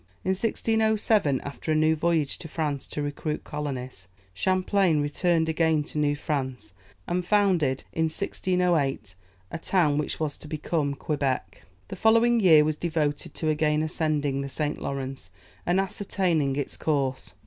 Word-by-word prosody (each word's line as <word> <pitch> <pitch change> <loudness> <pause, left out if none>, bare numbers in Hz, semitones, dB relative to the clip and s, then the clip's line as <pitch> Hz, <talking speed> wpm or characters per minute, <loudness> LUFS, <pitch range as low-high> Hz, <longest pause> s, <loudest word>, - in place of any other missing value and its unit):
In - - -2
1607, 220 - +1
after 140 +3 -5
a - - +3
new 155 +1 +3
voyage 160 -2 0
to 165 - -7
France 150 -3 -3
to 150 - -3
recruit 150 +1 -3
colonists, 130 -9 -5 0.3
Champlain 185 - +2
returned 160 +3 +1
again 160 -1 +2
to 150 - -5
New 145 -1 +2
France, 130 -8 -4 0.3
and 180 +1 -1
founded, 175 -9 +2
in 160 - +1
1608, 165 - 0 0.4
a - - -4
town 155 -5 +2
which 150 - -2
was 155 -2 -2
to - - -10
become 150 -1 -1
Quebec. 140 -3 -2 0.2
The - - -5
following 230 +1 +4
year 160 -7 +7
was 155 0 -1
devoted 155 -4 -2
to 160 - -1
again 150 0 +1
ascending 150 -3 0
the 140 - -4
St. 150 +2 -3
Lawrence, 135 -6 -5 0.4
and 175 +2 +3
ascertaining 180 -7 0
its 145 -1 -3
course. 135 -4 -1
155 Hz, 150 wpm, -26 LUFS, 145-175 Hz, 0.4 s, year